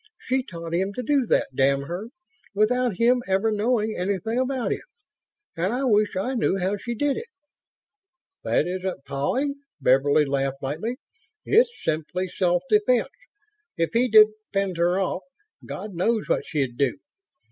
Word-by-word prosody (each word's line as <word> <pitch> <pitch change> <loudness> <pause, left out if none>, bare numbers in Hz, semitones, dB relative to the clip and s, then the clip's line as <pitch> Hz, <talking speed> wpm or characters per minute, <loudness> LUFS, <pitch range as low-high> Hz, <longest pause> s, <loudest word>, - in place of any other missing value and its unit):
She 260 +1 0
taught 170 -8 -8
him 190 +3 0
to 250 - -3
do 275 -1 +2
that, - - +2
damn 135 +1 +2
her, 175 +9 -5 0.5
without 235 0 +2
him 245 +3 +3
ever 195 +3 +2
knowing 215 0 0
anything 200 +5 -1
about 260 -1 -1
it... - - -6 0.7
and 180 +4 0
I 255 +3 -1
wish 210 -5 +2
I 220 +8 -1
knew 230 -5 +1
how 190 +2 0
she 235 +3 -5
did 285 +3 0
it." 470 - -6 1.2
"That - - +2
isn't 185 -4 -4
pawing," 270 - -1 0.2
Beverly 140 +3 +4
laughed 135 0 -2
lightly. 170 - -3 0.5
"It's 470 +4 +5
simply 160 +4 -2
self 180 -1 +1
defense. 220 +5 +3 0.7
If 165 0 0
he 240 +2 +3
didn't 215 -1 +6
fend 195 -3 -1
her 175 +2 +2
off, 190 -1 -1 0.4
God 210 -1 -7
knows 215 +6 0
what - - 0
she'd 135 -6 -2
do. 140 -3 +1
200 Hz, 155 wpm, -24 LUFS, 170-240 Hz, 1.2 s, didn't